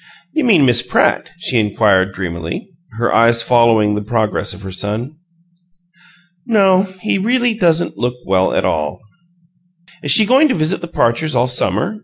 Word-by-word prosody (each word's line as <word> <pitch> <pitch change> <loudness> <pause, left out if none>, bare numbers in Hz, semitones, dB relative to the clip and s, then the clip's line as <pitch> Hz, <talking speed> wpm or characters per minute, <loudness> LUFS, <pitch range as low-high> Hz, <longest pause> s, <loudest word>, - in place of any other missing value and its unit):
"You 315 - 0
mean 190 - +4
Miss 120 -2 +3
Pratt?" - - 0
she 130 -8 -1
inquired, 100 -2 +1
dreamily, 85 - -6 0.3
her 120 +1 -1
eyes 115 +1 +3
following 115 -4 +3
the 105 - -3
progress 110 0 -2
of 95 +3 -10
her 95 - -7
son. 110 +10 -4 1.3
"No, 195 -3 +2
he 205 -1 -1
really 240 +3 +1
doesn't 175 -5 0
look 125 0 -2
well 95 -1 +1
at - - -1
all." 75 -2 -2 1.0
"Is 145 - -5
she 215 +10 +6
going 265 +7 +4
to 275 - -1
visit 165 +3 -1
the 170 - -6
Parchers 155 -1 -1
all 120 +1 +2
summer?" 185 - -2
125 Hz, 160 wpm, -16 LUFS, -, 1.3 s, she